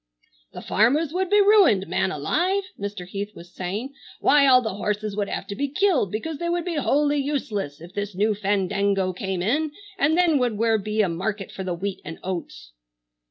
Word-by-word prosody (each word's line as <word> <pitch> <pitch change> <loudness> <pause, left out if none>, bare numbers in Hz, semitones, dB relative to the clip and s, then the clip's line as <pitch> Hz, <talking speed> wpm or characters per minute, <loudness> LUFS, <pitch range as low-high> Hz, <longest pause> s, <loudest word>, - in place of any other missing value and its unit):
"The - - -8
farmers 280 +9 +2
would 370 0 -1
be 415 +1 +5
ruined, 390 - +5
man 185 +2 0
alive!" 355 - 0 0.2
Mr. 200 -2 -5
Heath 200 +3 -6
was 175 +1 -13
saying. 205 +9 -4 0.3
"Why, 285 -1 +5
all 255 -1 +6
the 220 - -2
horses 210 +1 -2
would 205 -1 -2
have - - -4
to 200 - -6
be 285 +6 -1
killed, 295 - +1
because 285 +8 -4
they 340 - -2
would 345 0 -1
be 345 -3 -2
wholly 290 0 +2
useless 225 - -3
if 170 +3 -12
this 205 -1 -4
new 210 +3 +2
fandango 200 -1 0
came 185 -1 -3
in, 290 +9 +1 0.3
and 305 +4 +3
then 335 -5 +4
where 250 -2 +1
would 220 -1 +1
be 215 +1 +1
a - - +1
market 190 +4 -3
for 190 - -6
the 180 -2 -2
wheat 195 +2 -4
and 160 - -7
oats?" 175 - -6
210 Hz, 200 wpm, -24 LUFS, 195-290 Hz, 0.3 s, all